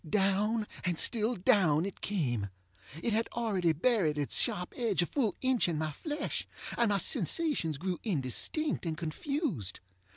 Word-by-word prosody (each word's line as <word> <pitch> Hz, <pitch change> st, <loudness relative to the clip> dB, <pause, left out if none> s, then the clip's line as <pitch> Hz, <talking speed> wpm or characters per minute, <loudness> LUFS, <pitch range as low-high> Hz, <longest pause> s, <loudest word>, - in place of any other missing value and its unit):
Down 210 Hz, +3 st, +2 dB, 0.2 s
and 175 Hz, -3 st, 0 dB
still 230 Hz, +4 st, +2 dB
down, 180 Hz, -, +3 dB
it 200 Hz, -, -7 dB
came. 120 Hz, -, -1 dB, 0.5 s
It 230 Hz, -, +1 dB
had 225 Hz, +1 st, 0 dB
already 200 Hz, -8 st, +1 dB
buried 165 Hz, -, +2 dB
its 145 Hz, -2 st, +1 dB
sharp 180 Hz, 0 st, 0 dB
edge 225 Hz, -8 st, +1 dB
a -, -, 0 dB
full 235 Hz, 0 st, 0 dB
inch 260 Hz, -5 st, +2 dB
in 165 Hz, -3 st, -1 dB
my 155 Hz, 0 st, -1 dB
flesh, 295 Hz, -, -3 dB, 0.3 s
and 235 Hz, -2 st, +3 dB
my 200 Hz, -, +2 dB
sensations 195 Hz, -, +1 dB
grew 180 Hz, +3 st, -3 dB
indistinct 190 Hz, -, 0 dB
and 160 Hz, -1 st, -2 dB
confused. 170 Hz, -, -3 dB
195 Hz, 155 wpm, -31 LUFS, 160-235 Hz, 0.5 s, down